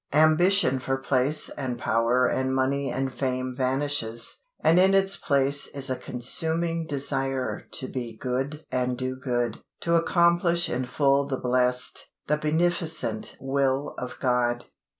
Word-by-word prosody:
Ambition 155 -1 +4
for 135 +1 -1
place 135 +2 +1
and 130 -4 -4
power 120 +2 +2
and 130 +1 0
money 135 +1 0
and 135 0 -2
fame 130 -1 -2
vanishes, 130 -3 -1 0.3
and 165 +3 +5
in 190 +1 +5
its 195 0 +3
place 140 0 +2
is 135 -1 -1
a - - +1
consuming 160 +7 -2
desire 135 -2 -2
to 130 - -3
be 120 -4 -6
good 135 +4 -3
and 125 -1 0
do 130 0 -2
good, 120 -3 -2 0.2
to 170 - -1
accomplish 170 0 +3
in 125 +1 -1
full 140 +1 +2
the 135 -2 -2
blessed, 125 0 0 0.2
the 150 - +2
beneficent 155 -6 -1
will 135 +1 0
of 125 - -6
God. 125 -2 0
135 Hz, 140 wpm, -26 LUFS, 125-155 Hz, 0.3 s, and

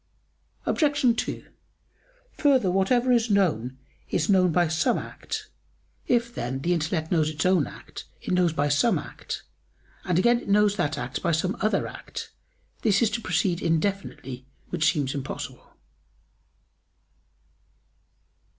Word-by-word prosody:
Obj. 285 -6 +2
2: - - -6 0.9
Further, 265 - +3
whatever 240 +7 +2
is 235 -1 +3
known 150 - +1 0.3
is 160 - 0
known 185 -3 +4
by 175 +1 +3
some 160 0 +1
act. - - -6 0.6
If, 235 -1 +1
then, 130 - -3
the 175 +4 +1
intellect 160 -1 -1
knows 160 -3 +3
its 155 +3 -3
own 180 -5 +3
act, - - -10
it - - -3
knows 180 -1 +4
it 160 - -7
by 145 0 +1
some 145 +11 +3
act, - - -6 0.6
and 180 -3 0
again 235 +5 +4
it - - -9
knows 205 0 +4
that 160 -6 -1
act - - -4
by 170 - +1
some 180 +5 0
other 215 +2 +1
act; - - -8 0.5
this 210 -1 +3
is 220 - +2
to 235 - -2
proceed 185 -6 0
indefinitely, 160 -7 -2 0.2
which 155 +2 +3
seems 140 -5 -1
impossible. 135 -2 -6
180 Hz, 140 wpm, -26 LUFS, 155-215 Hz, 0.9 s, known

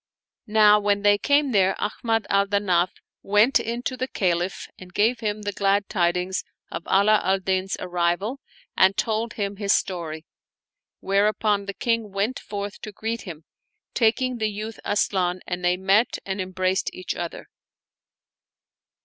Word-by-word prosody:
Now 210 -1 +6
when 205 0 0
they 205 0 +5
came 285 +1 +2
there, 190 -3 +3
Ahmad 225 +1 -1
al 200 0 +2
Danaf 185 -3 +2 0.3
went 210 +6 +4
in 235 +2 -4
to 255 - -2
the 255 +1 -3
Caliph 180 -4 -1
and 185 -1 -12
gave 225 +6 +2
him 210 -1 -3
the 205 - -2
glad 200 0 +1
tidings 180 +1 0 0.3
of 165 +1 -6
Ala 210 +2 +4
al 190 +1 +2
Din's 190 0 -1
arrival 180 +8 -1 0.4
and 190 +1 +4
told 225 0 -1
him 200 -1 -3
his 200 -1 +2
story; 165 -4 -2 0.8
whereupon 205 +1 +1
the 200 - -5
King 230 -3 -1
went 200 +6 -1
forth 205 0 -6
to 215 - -7
greet 225 +3 -4
him, 165 -5 -9 0.5
taking 245 +2 +1
the 215 -1 +1
youth 215 +2 -6
Asian 185 -3 0
and 180 0 -4
they 180 0 +2
met 195 +5 +2
and 190 0 -3
embraced 185 0 -1
each 185 - -5
other. 170 -1 -6
200 Hz, 150 wpm, -24 LUFS, 185-215 Hz, 0.8 s, Now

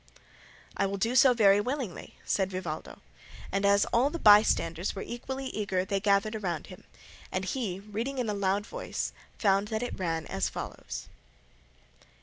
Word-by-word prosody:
"I - - +1
will 200 +1 -3
do 230 +5 0
so 255 0 +7
very 205 -3 +5
willingly," 250 - -4
said 190 -2 +1
Vivaldo; 185 -5 -6 0.5
and 195 +1 +1
as 200 0 +4
all 245 +4 +4
the 335 - -4
bystanders 205 - +4
were 195 - -4
equally 265 +3 -5
eager 190 -3 -1
they 195 +1 0
gathered 205 +2 +1
round 170 -6 -2
him, 185 - -13 0.5
and 185 0 -2
he, 195 -4 -2
reading 225 +7 -4
in 250 -3 -1
a 210 - 0
loud 200 0 0
voice, - - -4 0.2
found 200 -1 +2
that 220 +2 -2
it 245 - -5
ran 165 -3 -1
as - - -1
follows. 60 0 -6
200 Hz, 160 wpm, -29 LUFS, 190-230 Hz, 0.5 s, so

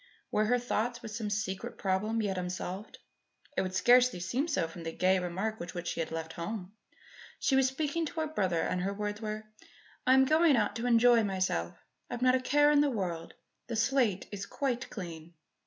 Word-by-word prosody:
Were 215 - +2
her 245 +3 +3
thoughts 240 0 -2
with 220 - -6
some 215 -1 -3
secret 200 -2 -3
problem 210 +4 0
yet 195 -2 -1
unsolved? 185 +2 -5 0.6
It - - +2
would 185 0 -3
scarcely 245 -1 +5
seem 245 - -1
so 280 - 0
from 165 +1 -10
the 165 0 -4
gay 185 +3 +2
remark 190 +5 -3
with 175 +1 -7
which 175 0 -3
she - - -4
had 165 - -1
left 160 0 -5
home. 185 +2 -5 0.6
She 270 - +1
was 265 -1 +5
speaking 305 +4 -1
to 320 - -4
her - - 0
brother 185 - 0
and 180 - -1
her 195 +2 -2
words 210 +1 -3
were: 215 0 -4 0.6
"I 260 - +7
am 265 0 +6
going 310 +1 +5
out 210 -1 +1
to 235 +2 -2
enjoy 235 -1 +5
myself. 185 - -1 0.3
I've 245 - -3
not 255 0 +5
a 260 - +3
care 290 +3 +4
in 290 -1 +5
the 295 - +3
world. 175 -8 -3 0.3
The 230 - -3
slate 220 -4 +1
is 200 -1 -5
quite 260 -3 -2
clean." 170 -4 -8
215 Hz, 205 wpm, -31 LUFS, 185-250 Hz, 0.6 s, I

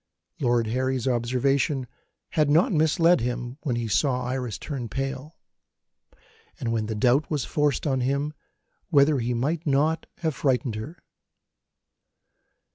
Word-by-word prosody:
Lord 120 -3 +2
Harry's 130 +2 -1
observation 130 +3 +1 0.4
had 150 -2 +1
not 175 - +4
misled 165 +1 +4
him, 125 +2 -3
when 135 -6 -1
he 120 -1 -2
saw 125 +4 +1
Iris 125 -5 -3
turn 130 -6 -5
pale, 135 +3 -4 1.2
and 115 - -2
when 110 -2 -1
the 110 - -3
doubt 125 +7 +2
was 145 -6 -1
forced 150 0 0
on 135 -3 +1
him 140 +4 -1 0.6
whether 145 -3 +4
he 120 +1 -1
might 150 +7 -1
not 150 +3 +1 0.2
have 160 -2 +1
frightened 130 -4 0
her. 110 +11 -7
135 Hz, 130 wpm, -25 LUFS, 120-150 Hz, 1.2 s, not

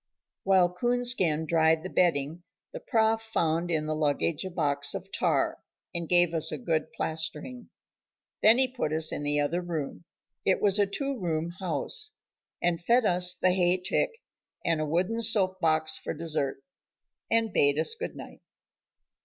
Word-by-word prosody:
While 185 -2 +3
Coonskin 240 -8 +1
dried 160 0 +2
the 185 - -5
bedding, 165 -2 +1 0.3
the - - -5
Prof 225 - +1
found 170 -6 -1
in 155 -2 0
the 155 - -1
luggage 155 +1 0
a 190 - -4
box 145 -5 0
of - - -7
tar, - - 0 0.3
and 170 -1 -4
gave 175 -1 +4
us 160 -2 0
a 155 - -3
good 155 +3 -1
plastering. 160 - -4 0.7
Then 220 +3 +6
he 260 0 +3
put 250 -11 -3
us 160 0 +1
in - - -4
the 145 0 0
other 150 +5 0
room, 170 -2 -5 0.4
it 190 - +2
was 205 0 +2
a 200 - +3
two 275 +7 -3
room 165 -2 -2
house, 430 - -2 0.5
and 175 -1 0
fed 235 +4 +3
us 180 -1 +3
the 185 - +2
hay 180 0 +2
tick, 180 - 0 0.6
and 165 -2 +1
a 155 - -1
wooden 180 +9 0
soap 195 -4 +2
box 155 -2 +1
for - - -5
dessert, 150 -5 -3 0.7
and 225 -1 +1
bade 145 0 +3
us 160 - 0
good 460 - -6
night. - - -11
175 Hz, 165 wpm, -28 LUFS, 155-205 Hz, 0.7 s, Then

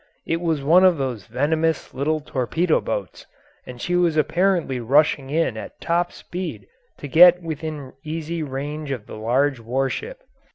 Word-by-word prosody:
It 165 +1 -1
was 160 -5 -1
one 170 +6 +5
of 185 -3 +5
those 125 -8 -4
venomous 155 +6 0
little 155 +4 -1
torpedo 155 +5 0
boats, - - -5 0.4
and 125 -1 -9
she 175 +7 -1
was 175 -3 +2
apparently 170 -4 +1
rushing 135 +2 +2
in 150 -6 0
at - - -9
top 175 +1 0
speed 180 +1 -6 0.3
to 145 - -7
get 175 +4 +7
within 155 -4 -5
easy 160 +1 -4
range 145 +1 -5
of 125 -6 -4
the - - -11
large 125 +5 +1
warship. 135 - -3
155 Hz, 155 wpm, -22 LUFS, 135-170 Hz, 0.4 s, get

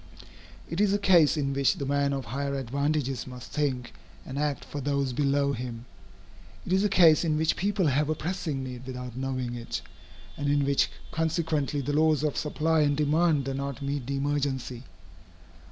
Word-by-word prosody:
It 165 +5 -2
is 205 -1 +3
a - - +3
case 175 -6 +5
in 140 -2 0
which 140 +6 +2
the 145 -6 -4
man 140 0 +1
of 135 -2 -3
higher 140 +5 -2
advantages 135 +1 -1
must 125 -1 -9
think 130 -5 -1 0.3
and 135 +1 -5
act 150 -1 -1
for 145 - -6
those 140 -1 0
below 140 +1 +1
him. 120 -2 -6 0.8
It 180 - -1
is 190 +1 +3
a 210 - +2
case 170 -5 +6
in 155 -2 +1
which 160 +1 +2
people 200 0 0
have 145 +1 +2
a 155 - +1
pressing 155 -4 -3
need 125 0 -7
without 125 -2 -6
knowing 130 -2 -3
it, 120 -1 -5 0.5
and 145 0 -1
in 145 -1 +2
which 140 0 +2 0.2
consequently 160 -3 0
the 145 +2 -2
laws 155 0 +3
of 150 -2 0
supply 160 +1 +1
and 145 -2 +2
demand 150 -1 +2
do 135 - -2
not 140 0 -4
meet 140 -2 -3
the 140 0 -1
emergency. 135 -3 -2
140 Hz, 185 wpm, -28 LUFS, 135-155 Hz, 0.8 s, case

